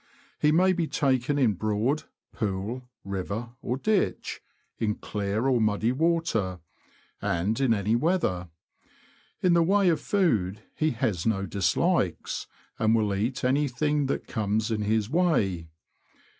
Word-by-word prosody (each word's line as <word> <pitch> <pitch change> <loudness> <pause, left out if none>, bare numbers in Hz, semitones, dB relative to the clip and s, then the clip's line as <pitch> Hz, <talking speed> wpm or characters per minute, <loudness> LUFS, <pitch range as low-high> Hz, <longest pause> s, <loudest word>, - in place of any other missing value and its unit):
He 150 - +4
may 185 +4 +4
be 170 -3 -1
taken 135 0 +1
in 125 -7 +3
Broad, 110 - 0 0.3
pool, 110 +5 -3
river, 100 +4 -4
or 125 - -2
ditch; 210 +7 0 0.4
in 105 -2 0
clear 105 +3 -2
or 130 -3 +3
muddy 110 +2 +2
water, 135 - 0 0.6
and 95 +8 0
in 130 -3 +3
any 105 +1 +2
weather. 120 - 0 0.9
In 180 -2 +5
the 170 - +5
way 195 +2 +4
of 165 - +1
food, 110 - +1
he 155 - +1
has 110 - -1
no 100 -3 +1
dislikes, 100 0 0 0.3
and 110 0 +3
will 105 -3 +1
eat 115 +8 -2
anything 145 +2 +1
that - - -2
comes 110 0 -1
in 110 -1 0
his 105 0 +1
way. 110 - +1
115 Hz, 135 wpm, -27 LUFS, 105-150 Hz, 0.9 s, In